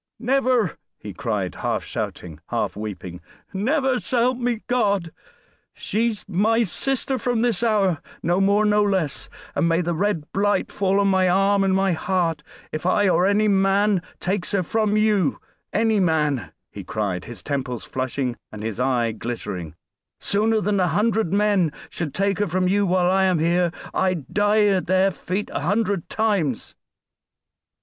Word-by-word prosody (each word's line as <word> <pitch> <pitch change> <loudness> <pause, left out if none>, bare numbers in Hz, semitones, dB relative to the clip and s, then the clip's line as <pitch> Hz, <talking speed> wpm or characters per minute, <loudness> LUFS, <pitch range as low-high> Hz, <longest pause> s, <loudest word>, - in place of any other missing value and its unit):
"Never!" 250 - +1 0.2
he 105 -1 -8
cried, 100 -3 -2
half - - -2
shouting, 80 -4 -5
half - - -2
weeping. 95 -4 -7 0.3
"Never, 260 +5 +1
s'help 245 +1 +1
me 240 -2 -1
God! 200 -8 0 0.6
She's 220 +1 -2
my 215 +5 +2
sister 265 +5 0
from 240 -1 0
this 235 -4 +1
hour 200 -8 +2 0.2
no 175 +4 +2
more, 200 +2 +3
no 210 0 +3
less. 190 -8 -1 0.2
And 170 - +1
may 165 +1 +2
the 170 0 -1
red 175 -2 -1
blight 200 0 +1
fall 195 0 +1
on 200 - +3
my 190 -1 +3
arm 195 +2 +3
and 190 -1 +2
my 195 0 +2
heart, 170 -2 0 0.3
if 155 - -4
I 200 +3 +2
or 180 +1 +3
any 210 +2 +3
man 195 0 +3 0.2
takes 190 +1 -2
her 195 -2 +2
from 215 +3 0
you 210 -8 +2 0.3
any 220 0 +2
man!" 150 - +1 0.2
he - - -8
cried, 100 -4 -3
his 120 -1 -9
temples 135 -4 -3
flushing 130 -1 -3
and 105 -1 -8
his 110 0 -4
eye 125 -3 +1
glittering; 105 -8 -5 0.4
"sooner 215 +2 +2
than 205 -1 0
a 180 - +3
hundred 215 -1 +1
men 200 -5 +2 0.2
should 160 -5 -4
take 200 0 0
her 205 - +1
from 185 +2 0
you 200 +1 +2
while 180 0 +2
I 190 0 +3
am 185 -2 +2
here 170 +2 +2 0.2
I'd 185 -8 -1
die 210 +1 +3
at 195 -3 +1
their 185 +1 +3
feet 190 +3 -4
a - - -1
hundred 200 +1 0
times." 200 - -1
190 Hz, 160 wpm, -23 LUFS, 160-210 Hz, 0.6 s, more